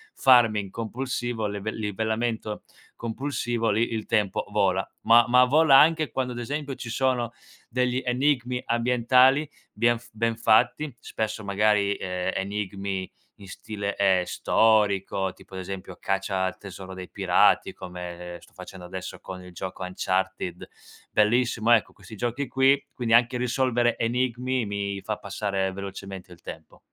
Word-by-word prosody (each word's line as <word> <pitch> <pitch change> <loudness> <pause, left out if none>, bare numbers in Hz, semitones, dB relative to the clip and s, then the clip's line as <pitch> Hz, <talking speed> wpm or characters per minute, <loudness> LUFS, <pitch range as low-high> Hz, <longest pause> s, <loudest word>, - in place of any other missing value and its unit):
farming 115 -6 +4
compulsivo, 120 0 -3
leve 100 +1 -4
livellamento 110 +1 -2 0.3
compulsivo, 120 -1 -2
lì 115 +3 0
il 110 -1 -3
tempo 105 -4 0
vola. 95 -2 +1 0.2
Ma 115 +1 +6
ma 125 +1 +6
vola 145 +1 +6
anche 155 0 +4
quando, 125 -1 -2
ad 120 - -6
esempio, 140 +3 -4
ci 120 - -7
sono 120 -1 0 0.4
degli 125 +1 0
enigmi 125 -1 +1
ambientali 125 +4 +3 0.3
bien 120 +2 +3
f 120 - -16
ben 115 +1 0
fatti, 120 +5 +2
spesso 110 0 -4
magari, 100 0 +2
ehm, 90 -1 -3
enigmi 100 -1 -3 0.3
in 100 - -13
stile, 100 0 -5
ehm, 95 -2 +3
storico, 100 -4 +2
tipo 95 - -15
ad 95 - -4
esempio 95 -1 -7
caccia 95 -1 -1
al 95 - -3
tesoro 95 -1 -9
dei 95 -1 -8
pirati, - - +3
come 90 -1 -8
sto - - -20
facendo 90 0 -10
adesso 95 +1 -7
con 90 -1 -9
il 90 - -12
gioco 95 +2 -7
Uncharted, 95 -1 -2 0.4
bellissimo, 115 +1 +2
ecco 115 -3 +4
questi 110 - -12
giochi 120 +5 -2
qui. 135 +1 +3
Quindi 115 -2 +2
anche 120 +1 +3
risolvere 120 -1 +1
enigmi 125 +1 0
mi 100 -1 -3
fa 105 +2 -3
passare 100 -1 -2
velocemente 95 -1 -8
il 85 0 -14
tempo. 80 -2 -10
110 Hz, 145 wpm, -26 LUFS, 95-125 Hz, 0.4 s, Ma